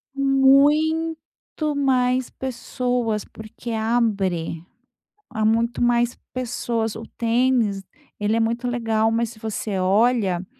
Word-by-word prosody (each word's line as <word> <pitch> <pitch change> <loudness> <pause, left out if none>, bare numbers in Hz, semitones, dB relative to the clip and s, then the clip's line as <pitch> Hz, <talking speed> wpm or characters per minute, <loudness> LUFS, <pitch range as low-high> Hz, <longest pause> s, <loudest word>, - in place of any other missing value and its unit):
Muito 295 +3 +2
mais 255 -2 +1
pessoas, 245 -3 -2
porque 220 +2 -9
abre. 205 -8 0 0.7
Há 220 - -3
muito 230 +2 +1
mais 240 0 +2 0.2
pessoas. 235 -3 -2
O 225 - -7
tênis, 230 -4 +1 0.4
ele 210 +2 +1
é - - +2
muito 235 +2 -1
legal, 225 -2 +1
mas 230 0 0
se 220 - -15
você 215 -2 -3
olha, 195 -1 +2
235 Hz, 110 wpm, -22 LUFS, 220-255 Hz, 0.7 s, Muito